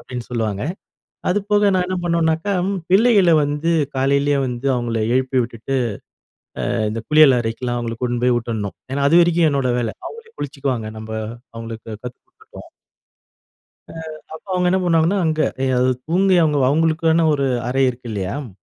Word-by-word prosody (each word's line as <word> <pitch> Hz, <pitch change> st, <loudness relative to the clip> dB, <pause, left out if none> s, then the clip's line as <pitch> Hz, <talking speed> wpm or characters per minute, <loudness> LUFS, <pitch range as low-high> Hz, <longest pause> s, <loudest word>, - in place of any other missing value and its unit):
அப்டீன்னு 125 Hz, -2 st, -8 dB
சொல்லுவாங்க. 110 Hz, -4 st, -2 dB, 0.7 s
அது 180 Hz, -, +2 dB
போக 205 Hz, -1 st, +4 dB
நான் 180 Hz, -1 st, +1 dB
என்ன 185 Hz, 0 st, -2 dB
பண்ணுவேன்னாக்க, 165 Hz, +1 st, 0 dB, 0.4 s
பிள்ளைகள 200 Hz, -3 st, +5 dB
வந்து 145 Hz, +3 st, -1 dB, 0.3 s
காலையிலயே 140 Hz, +2 st, +2 dB
வந்து 125 Hz, +1 st, -4 dB
அவங்கள 120 Hz, -2 st, -2 dB
எழுப்பி 130 Hz, 0 st, +1 dB
விட்டுட்டு, 120 Hz, +3 st, -4 dB, 1.0 s
அ -, -, -1 dB, 0.2 s
இந்த 115 Hz, +1 st, -4 dB
குளியல் 150 Hz, -4 st, +6 dB
அறைக்கெலாம் 120 Hz, +1 st, -3 dB
அவங்கள 115 Hz, -1 st, -4 dB
கூட்டின்னு 120 Hz, -1 st, -1 dB
போய் 125 Hz, -1 st, +3 dB
விட்டுடணும். 110 Hz, -4 st, -4 dB, 0.2 s
ஏன்னா 140 Hz, +1 st, 0 dB
அது 170 Hz, +3 st, +6 dB
வரைக்கும் 170 Hz, -1 st, +3 dB
என்னோட 135 Hz, -2 st, 0 dB
வேல. 115 Hz, -2 st, -3 dB
அவங்களே 455 Hz, 0 st, -10 dB
குளிச்சுக்குவாங்க. 135 Hz, -6 st, -3 dB
நம்ப 110 Hz, 0 st, -8 dB, 0.4 s
அவங்களுக்கு 115 Hz, 0 st, -8 dB
கத்து 125 Hz, 0 st, -7 dB
கொடுத்துட்டோம். 435 Hz, +5 st, -16 dB, 1.2 s
அ -, -, -9 dB, 0.4 s
அப்போ 160 Hz, -, -11 dB
அவங்க 180 Hz, -1 st, +1 dB
என்ன 190 Hz, +1 st, +2 dB
பண்ணுவாங்கன்னா, 170 Hz, +2 st, +2 dB
அங்க. 155 Hz, -1 st, +1 dB, 0.2 s
எ -, -, +2 dB
அது 125 Hz, +1 st, +3 dB, 0.2 s
தூங்கி, 185 Hz, +3 st, +3 dB
அவங்க 150 Hz, -2 st, +1 dB
அவங்களுக்கான 160 Hz, +2 st, +2 dB
ஒரு 140 Hz, -1 st, 0 dB, 0.2 s
அறை 135 Hz, +2 st, +1 dB
இருக்கு 125 Hz, -1 st, -8 dB
இல்லையா? 100 Hz, -2 st, -3 dB
அ -, -, -10 dB
140 Hz, 160 wpm, -20 LUFS, 120-170 Hz, 1.2 s, குளியல்